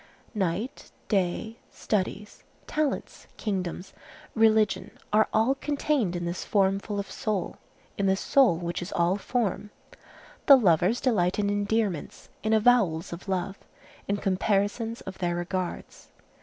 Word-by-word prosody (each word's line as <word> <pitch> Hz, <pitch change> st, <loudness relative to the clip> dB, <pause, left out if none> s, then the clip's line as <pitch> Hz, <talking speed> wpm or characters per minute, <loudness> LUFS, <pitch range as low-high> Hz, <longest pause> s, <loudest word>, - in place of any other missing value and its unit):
Night, 210 Hz, -, -2 dB, 0.2 s
day, 205 Hz, +3 st, 0 dB
studies, 210 Hz, 0 st, -3 dB, 0.2 s
talents, 305 Hz, -2 st, -2 dB
kingdoms, 190 Hz, -2 st, -3 dB, 0.4 s
religion, 220 Hz, -2 st, +2 dB, 0.2 s
are 215 Hz, +1 st, +5 dB
all 225 Hz, +5 st, +3 dB
contained 280 Hz, -, -1 dB
in 175 Hz, 0 st, -3 dB
this 170 Hz, +1 st, -3 dB
form 195 Hz, -1 st, +2 dB
full 205 Hz, 0 st, -4 dB
of 200 Hz, -, -5 dB
soul, 205 Hz, -5 st, -2 dB, 0.4 s
in 200 Hz, -, +2 dB
this 190 Hz, 0 st, +2 dB
soul 260 Hz, -12 st, +4 dB
which 175 Hz, +1 st, -4 dB
is 175 Hz, -, -6 dB
all 175 Hz, +2 st, +2 dB
form. 210 Hz, -1 st, -2 dB, 0.8 s
The 275 Hz, -, +10 dB
lovers 185 Hz, 0 st, +3 dB
delight 190 Hz, -8 st, +1 dB
in 205 Hz, -1 st, +1 dB
endearments, 205 Hz, -4 st, -2 dB
in 220 Hz, -, -1 dB
avowals 210 Hz, -8 st, +3 dB
of 175 Hz, +3 st, -9 dB
love, 190 Hz, +1 st, -2 dB, 0.5 s
in 200 Hz, -, 0 dB
comparisons 205 Hz, +4 st, 0 dB
of 190 Hz, 0 st, -9 dB
their 175 Hz, -2 st, 0 dB
regards. 175 Hz, +1 st, -4 dB
200 Hz, 130 wpm, -27 LUFS, 180-220 Hz, 0.8 s, The